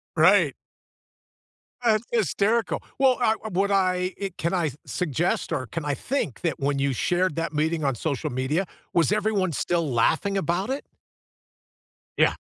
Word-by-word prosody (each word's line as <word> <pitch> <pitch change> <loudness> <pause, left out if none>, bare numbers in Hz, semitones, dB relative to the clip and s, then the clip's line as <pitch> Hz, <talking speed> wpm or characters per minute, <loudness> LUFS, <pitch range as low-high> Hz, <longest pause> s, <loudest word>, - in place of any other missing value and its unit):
Right. - - +5 1.3
That's 220 -2 +3
hysterical. 225 0 +1 0.2
Well, 265 -2 +4
I 220 - +4
uh, - - -3
what 195 +2 +1
I 185 -1 +1
i 195 -1 -2
can 170 +2 -1
I 175 -4 +1
s 140 - -7
suggest 175 0 -1
or 130 - -1
can 160 +3 -5
I 145 - 0
think 240 - -3
that, 165 -3 -1
when 140 0 0
you 140 -1 +1
shared 180 +5 +1
that 165 -1 -2
meeting 155 +1 0
on 135 -3 +1
social 140 0 -2
media, 130 +9 0 0.3
was 170 +1 +3
everyone 210 -4 +1
still 170 +2 0
laughing 160 - +2
about 185 - -1
it? 275 +2 -3 1.3
Yeah. - - +4
175 Hz, 160 wpm, -25 LUFS, 150-200 Hz, 1.3 s, Right